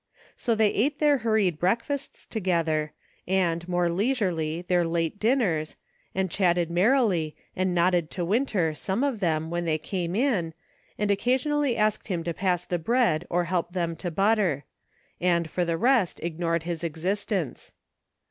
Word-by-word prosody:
So 235 -3 0
they 215 -1 +3
ate 280 +7 +1
their 295 -2 +3
hur 225 -1 +1
ried 185 -7 +1
breakfasts 235 +9 -1
together, 165 -7 0 0.4
and, 175 -2 0
more 175 -1 +2
leisurely, 175 -5 0
their 180 -1 +2
late 165 +3 -1
dinners, 210 - +1 0.4
and 190 -2 0
chatted 175 -3 +1
merrily, 185 - +2 0.2
and 185 -1 0
nodded 175 -2 +2
to 175 -2 -3
Winter, 200 - +1
some 190 - -2
of 275 -6 0
them, 160 -3 0
when 175 0 -2
they 160 -1 +1
came 175 +2 -3
in, 205 - 0 0.4
and 210 -1 +1
occasionally 260 +5 +1
asked 215 -1 +1
him 175 -5 -2
to 170 0 -2
pass 180 0 0
the 175 -1 -2
bread 175 -4 +1
or 175 0 +1
help 175 0 -2
them 170 -3 -1
to 180 - -3
butter; 195 -5 +1 0.5
and 170 -2 +2
for 180 - 0
the 165 -1 -1
rest, 235 -3 +2
ignored 170 0 -1
his 170 -1 -4
exist 180 +6 -2
ence. 175 - -3
180 Hz, 160 wpm, -26 LUFS, 170-215 Hz, 0.5 s, they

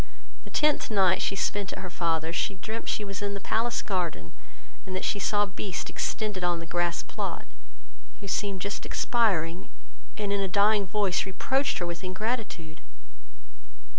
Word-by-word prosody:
The - - -9
tenth 300 -1 +3
night 190 -4 +4
she 195 - +1
spent 200 0 0
at - - -6
her 185 - -5
father's, 165 -1 0
she 195 - 0
dreamed 220 +5 -4
she 210 - 0
was 195 0 -5
in 200 0 -1
the - - -3
palace 230 +4 +1
garden, 170 - -1 0.5
and 185 - -5
that 185 - -1
she 205 - 0
saw 205 +1 +3
Beast 195 -1 -4
extended 210 -4 -1
on 175 -1 +2
the 165 - -5
grass 175 +1 0
plot, - - -4 0.7
who 200 - -7
seemed 195 -1 0
just 200 +2 -2
expiring, 180 - +1 0.5
and, 205 -1 0
in 200 - +1
a 195 - +1
dying 200 +1 +4
voice, 195 -1 +1
reproached 265 +8 +1
her 175 - -1
with 170 0 -4
her 185 - -4
ingratitude. 190 -5 -3
195 Hz, 170 wpm, -28 LUFS, 175-210 Hz, 0.7 s, night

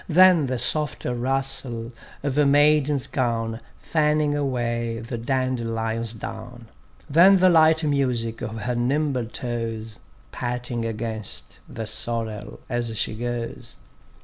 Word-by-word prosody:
Than 175 -3 +6
the 130 0 -1
soft 145 +4 0
rustle 130 -1 -2 0.3
of 140 -2 -1
a 150 - +4
maiden's 145 -1 +4
gown 115 -3 -1 0.2
Fanning 150 -1 +1
away 120 -4 -1
the 115 +1 -5
dandelion's 115 -3 -1
down; 115 +2 -8 0.4
Than 180 +6 +7
the 185 0 +5
light 160 -1 +5
music 125 -6 0
of 110 -1 -5
her 125 +3 -1
nimble 130 0 0
toes 115 -2 -4 0.3
Patting 120 -1 -3
against 110 - -3
the 110 - -5
sorrel 110 - -3
as 120 -2 -2
she - - -1
goes. 120 +1 -5
120 Hz, 120 wpm, -24 LUFS, 115-140 Hz, 0.4 s, Than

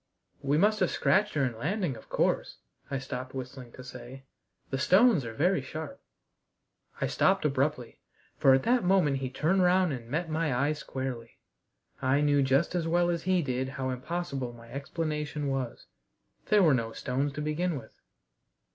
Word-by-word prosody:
"We 140 +2 +1
must 210 +5 +3
have - - +2
scratched 210 0 +2
her 140 -2 +2
in 120 -3 -3
landing, 180 - -1
of 110 - -14
course," - - 0 0.3
I 140 - -1
stopped 130 -1 -6
whistling 130 -1 -7
to 130 - -10
say, 125 +1 -10 0.5
"The 135 - -1
stones 190 - +5
are 115 - -5
very 175 +2 +2
sharp 160 - -7 0.5
" - - -27
I - - +2
stopped 190 -3 +2
abruptly, 140 -2 -1 0.4
for 135 -1 +5
at 135 - 0
that 245 0 +2
moment 180 -7 +3
he 130 -1 -3
turned 165 +8 +1
round 180 -2 +3
and 120 -3 -7
met 165 +6 -1
my 155 -4 0
eye 140 +4 +2
squarely. 130 -5 -6 0.6
I 135 +2 +2
knew 145 -1 +3
just 135 +6 +2
as 170 -2 -1
well 175 +1 +2
as 170 -1 -2
he 185 -2 +2
did 130 -1 -2
how 130 -1 -1
impossible 135 -2 -4
my 115 0 -14
explanation 150 0 -3
was. 135 -3 -3 0.6
There 210 -2 +5
were 155 -5 +5
no 115 -3 -1
stones, 135 +3 -1
to 150 - -4
begin 155 +2 -1
with. 110 -4 -10
140 Hz, 175 wpm, -29 LUFS, 130-175 Hz, 0.6 s, stones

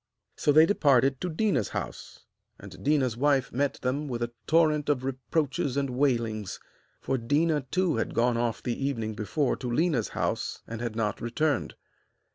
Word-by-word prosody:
So 145 - +2
they 155 +2 +7
departed 135 -7 +3
to 180 - -2
Déna's 155 - 0
house, - - -6 0.4
and - - -11
Déna's 135 -5 +1
wife 140 +1 +1
met 140 +2 0
them 140 +4 -1
with 120 -3 -3
a 120 - -3 0.2
torrent 155 -2 +3
of 135 -3 +1
reproaches 135 +1 -1
and 140 -2 0
wailings, 115 -6 0 0.4
for 135 - -1
Déna 145 +2 +1
too 180 -4 +1
had 115 - -2
gone 120 +1 +2
off 115 -1 -1
the 125 +2 -2
evening 115 -6 -2
before 120 +7 0
to 125 - -5
Léna's 130 -2 +1
house - - -2
and 115 0 -6
had 120 -2 -3
not 105 -3 -1
returned. 135 +4 -1
135 Hz, 165 wpm, -28 LUFS, 120-150 Hz, 0.4 s, they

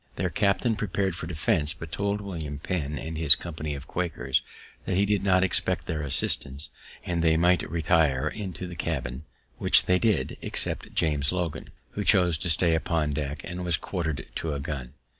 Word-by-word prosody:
Their - - -1
captain 105 +3 +1
prepar'd 100 -3 -1
for 85 - -6
defense; 80 -2 +3
but 85 -2 -9
told 100 +2 -1
William 80 -8 -5
Penn, 75 -2 -3
and 80 +3 -5
his 80 -3 +8
company 75 -3 -5
of 70 0 -8
Quakers, 70 -6 -1 0.4
that 90 - 0
he 100 - +4
did 105 -1 +1
not 95 -1 +4
expect 95 - +1
their 80 -2 -3
assistance, 70 0 0 0.4
and 85 -1 -1
they 80 -1 +4
might 90 -3 +3
retire 80 -4 +2
into 95 0 -5
the 90 -1 -7
cabin, 70 -4 -3 0.3
which - - +5
they 90 0 +3
did, 100 - 0
except - - 0
James 75 -3 +1
Logan, 85 -4 -3 0.2
who - - -3
chose 90 -4 +3
to 90 - -1
stay 85 +1 +3
upon 80 -2 0
deck, 75 0 -3
and 90 +1 -5
was 85 -3 +1
quarter'd 80 -6 -3
to 80 -2 -2
a - - -3
gun. 70 -2 -5
80 Hz, 180 wpm, -27 LUFS, 75-90 Hz, 0.4 s, his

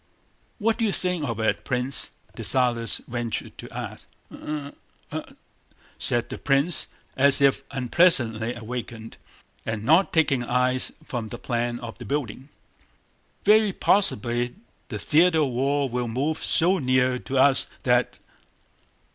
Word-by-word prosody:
"What 225 +1 0
do 230 - +2
you 210 - +1
think 180 -7 -1
of 115 -1 -4
it, 110 - 0
Prince?" 125 +1 +1 0.3
Dessalles 120 -3 +2
ventured 120 -1 -4
to - - -9
ask. - - -8 0.2
"I? 150 -2 -6 0.4
I?..." - - -4 0.8
said 120 -1 0
the - - -6
prince 140 +4 +2 0.3
as 140 +1 +5
if 140 -1 +3
unpleasantly 125 -4 +2
awakened, 115 -1 -7 0.5
and 110 -2 -4
not 160 - +4
taking 155 -6 +2
his 120 - -7
eyes 125 +1 +1
from 120 -3 -5
the 120 - -7
plan 120 0 -2
of 120 0 -8
the 120 - -8
building. 130 +1 -4 1.0
"Very 215 0 +5
possibly 120 -13 +1 0.3
the 110 - -5
theater 160 - +3
of 145 - +1
war 135 +3 0
will 125 -1 -3
move 140 +7 -2
so 180 +3 +3
near 130 -2 +1
to 135 - -4
us 135 +1 +4 0.2
that..." - - +1
130 Hz, 140 wpm, -24 LUFS, 120-150 Hz, 1.0 s, as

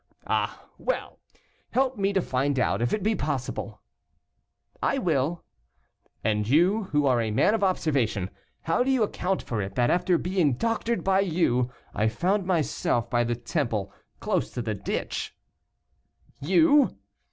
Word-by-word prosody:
"Ah, - - -1
well! - - -3 0.5
help 260 0 +2
me 200 -2 +1
to 190 -3 +1
find 135 +2 0
out, 110 -4 +1
if 120 - +1
it 215 - -1
be 220 +2 +2
possible." - - -4 1.0
"I 275 - +1
will." 165 - 0 0.8
"And 105 -1 0
you, 185 - +3
who 150 -5 +1
are 125 -3 +3
a 110 - -1
man 110 - +3
of 225 - 0
observation, 135 - 0 0.3
how 165 +9 +1
do 265 - -1
you 260 -4 +3
account 190 -2 -1
for 115 -3 -2
it, 95 0 -5
that 120 -1 +2
after 180 0 +2
being 175 -5 +1
doctored 230 - -1
by 190 0 +3
you, 155 -10 +1 0.2
I 105 +2 +1
found 180 - 0
myself 145 -9 0
by 120 0 +3
the 120 0 -1
Temple, 115 - -2 0.3
close - - 0
to 120 - -2
the 110 -1 -2
ditch." 100 - -4 1.0
"You!" 285 - +4
160 Hz, 150 wpm, -26 LUFS, 120-195 Hz, 1.0 s, You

